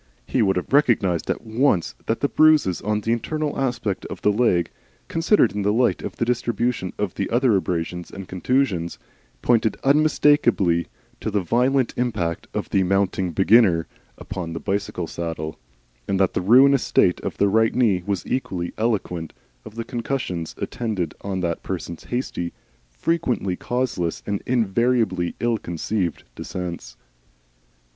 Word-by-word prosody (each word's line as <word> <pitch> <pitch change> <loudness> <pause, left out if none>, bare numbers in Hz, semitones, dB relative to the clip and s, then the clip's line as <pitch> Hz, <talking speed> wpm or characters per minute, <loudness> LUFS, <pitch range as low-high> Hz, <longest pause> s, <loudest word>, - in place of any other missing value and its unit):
He - - 0
would 95 -3 +3
have 90 +7 -3
recognised 110 - +3
at - - -2
once 110 - +1
that 115 - -1
the 140 - +3
bruises 155 - +4
on 105 +1 -1
the 115 - -1
internal 150 +6 -1
aspect 120 -7 -2
of - - -7
the - - +4
left 105 - -3
leg, 90 -8 +2 0.4
considered 165 - +3
in 105 +1 -3
the 100 +1 +2
light 120 +3 +2
of - - -6
the 115 - -1
distribution 120 -4 -1
of 105 -4 -2
the 100 - -3
other 120 -1 +3
abrasions 90 -1 -2
and 95 -2 -9
contusions, 95 -4 0 0.5
pointed 115 -2 +2
unmistakably 140 - +3 0.3
to - - -3
the 100 -2 0
violent 125 +6 +2
impact 105 -9 -1
of - - -3
the 95 - +3
Mounting 95 0 +1
Beginner 95 -1 +4 0.3
upon 90 -5 -6
the 80 - -4
bicycling 95 +1 -2
saddle, 80 -2 -5 0.5
and 95 -1 0
that 95 -2 +2
the - - 0
ruinous 130 +7 +6
state 90 - +2
of - - -4
the 100 - +3
right 110 +3 +2
knee 110 -8 +3
was 100 -2 -2
equally 90 -9 -3
eloquent 95 -7 -1 0.3
of 110 - -11
the 115 - -3
concussions 115 - -3
attendant 105 -10 -3
on 95 -2 -3
that 85 -2 -2
person's 85 -3 -6
hasty, 120 -8 -3 0.4
frequently 115 - -1
causeless, 115 -8 -2
and 100 -1 -2
invariably 115 -5 +1
ill 115 -2 +1
conceived 85 +1 -2
descents. 85 -9 -6
105 Hz, 150 wpm, -23 LUFS, 90-120 Hz, 0.5 s, ruinous